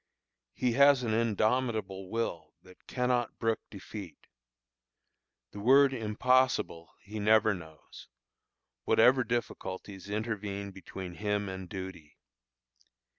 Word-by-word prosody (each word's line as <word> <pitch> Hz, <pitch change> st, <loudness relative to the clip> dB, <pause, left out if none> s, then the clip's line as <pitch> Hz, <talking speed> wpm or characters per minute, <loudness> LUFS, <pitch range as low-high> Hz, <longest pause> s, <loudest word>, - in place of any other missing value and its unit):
He 125 Hz, -, +1 dB
has 140 Hz, +1 st, +5 dB
an 110 Hz, -2 st, 0 dB
indomitable 110 Hz, -3 st, 0 dB
will 85 Hz, -10 st, -3 dB
that 90 Hz, 0 st, -19 dB
cannot 125 Hz, -2 st, 0 dB
brook 115 Hz, -1 st, 0 dB
defeat. 100 Hz, -3 st, -9 dB, 1.3 s
The 105 Hz, -, -9 dB
word 135 Hz, +5 st, +5 dB
impossible 115 Hz, -, +1 dB
he 105 Hz, +1 st, -7 dB
never 110 Hz, 0 st, +4 dB
knows, 80 Hz, -4 st, -12 dB, 0.8 s
whatever 130 Hz, +1 st, +5 dB
difficulties 100 Hz, -4 st, -4 dB
intervene 105 Hz, -2 st, -3 dB
between 95 Hz, -1 st, -8 dB
him 105 Hz, +1 st, -1 dB
and 95 Hz, -1 st, -6 dB
duty. 95 Hz, -6 st, -8 dB
105 Hz, 100 wpm, -30 LUFS, 95-120 Hz, 1.3 s, has